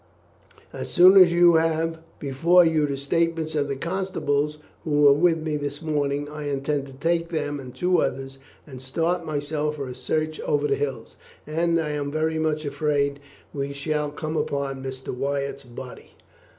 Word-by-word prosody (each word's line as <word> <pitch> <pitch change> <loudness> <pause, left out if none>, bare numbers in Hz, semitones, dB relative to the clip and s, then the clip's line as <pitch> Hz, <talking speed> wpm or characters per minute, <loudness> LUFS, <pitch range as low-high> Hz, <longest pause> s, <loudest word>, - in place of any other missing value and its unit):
As - - -6
soon 185 +2 +7
as 185 -3 +8
you 175 -1 +6
have 165 0 0 0.2
before 165 +6 +4
you 155 -2 +2
the 140 -1 -3
statements 160 +2 -1
of 145 -2 0
the 140 - -2
constables 150 -3 -1 0.3
who 150 -2 +1
were 140 -1 +8
with 165 +3 +3
me 155 -1 -2
this 145 0 -4
morning, 145 -2 -1
I 150 0 -5
intend 140 0 -2
to 135 - -12
take 165 +4 0
them 145 -3 -2
and 130 -2 -9
two 180 +5 +2
others 135 +1 -3 0.3
and 130 -4 -10
start 165 +6 -1
myself 150 0 -2
for 140 -3 -5
a 125 - -6
search 155 +5 -2
over 145 0 0
the - - +1
hills, 135 -5 -4 0.3
and 165 +2 +1
I 155 -2 -2
am 145 -1 -2
very 160 +1 0
much 155 -1 -1
afraid 145 -1 0
that - - -21 0.4
we 140 +1 -2
shall 150 +1 -2
come 155 +2 -5
upon 140 -3 -2
Mr. 130 -1 -6
Wyatt's 140 +1 -3
body." 125 +1 -11
150 Hz, 175 wpm, -24 LUFS, 140-160 Hz, 0.4 s, as